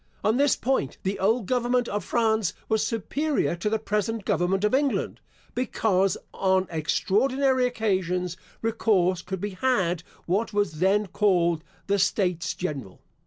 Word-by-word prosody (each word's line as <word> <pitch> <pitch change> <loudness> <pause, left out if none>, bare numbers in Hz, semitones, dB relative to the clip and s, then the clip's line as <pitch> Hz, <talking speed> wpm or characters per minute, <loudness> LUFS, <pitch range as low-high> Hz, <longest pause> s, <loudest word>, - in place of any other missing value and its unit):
On 220 +3 +2
this 285 0 +4
point 250 - -1
the 195 +1 -2
old 220 +3 +2
government 245 +1 +1
of 205 - -2
France 220 -5 +1
was 220 -1 +1
superior 275 - -1
to 190 +5 -1
the 220 - +1
present 210 0 -2
government 190 +3 +1
of 210 - +2
England, 275 +1 0 0.3
because, 195 -6 +1 0.2
on 190 -1 +2
extraordinary 255 - +1
occasions, 185 -7 -1 0.3
recourse 200 -5 +2
could 190 -1 -5
be 205 +2 -3
had 185 -5 +1 0.2
what 210 +6 0
was 205 -7 0
then 200 +3 +3
called 175 -4 +1 0.2
the 200 0 +1
States 180 -3 0
General. 140 - -5
205 Hz, 140 wpm, -26 LUFS, 185-230 Hz, 0.3 s, this